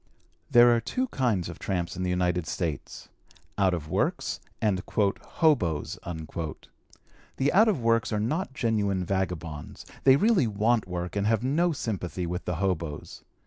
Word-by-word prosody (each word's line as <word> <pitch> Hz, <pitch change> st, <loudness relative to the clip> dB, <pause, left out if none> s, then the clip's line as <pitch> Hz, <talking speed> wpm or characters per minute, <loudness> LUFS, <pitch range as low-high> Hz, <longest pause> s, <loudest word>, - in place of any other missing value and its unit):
There 120 Hz, 0 st, +7 dB
are 115 Hz, -, 0 dB
two 255 Hz, -, -2 dB
kinds 115 Hz, -, 0 dB
of 85 Hz, -, -8 dB
tramps 85 Hz, -4 st, -2 dB
in 95 Hz, -, -5 dB
the 90 Hz, -, 0 dB
United 90 Hz, -2 st, 0 dB
States: 80 Hz, -4 st, -4 dB, 0.5 s
out 95 Hz, -3 st, +2 dB
of 75 Hz, -3 st, -6 dB
works -, -, -1 dB, 0.2 s
and 100 Hz, -4 st, +1 dB
"hoboes." 100 Hz, -, 0 dB, 1.4 s
The 140 Hz, +4 st, +1 dB
out 215 Hz, +5 st, +6 dB
of 195 Hz, -, +1 dB
works 115 Hz, -1 st, +2 dB
are 105 Hz, -, 0 dB
not 135 Hz, -, -2 dB
genuine 100 Hz, -6 st, 0 dB
vagabonds; 85 Hz, -5 st, -3 dB, 0.2 s
they 135 Hz, -1 st, +7 dB
really 190 Hz, -, +3 dB
want 110 Hz, +1 st, +1 dB
work 90 Hz, 0 st, -4 dB
and 100 Hz, 0 st, 0 dB
have 110 Hz, 0 st, +2 dB
no 165 Hz, +7 st, +2 dB
sympathy 95 Hz, -, -3 dB
with 90 Hz, +2 st, -4 dB
the 90 Hz, -, -1 dB
hoboes. 85 Hz, -4 st, -3 dB
100 Hz, 150 wpm, -27 LUFS, 90-120 Hz, 1.4 s, There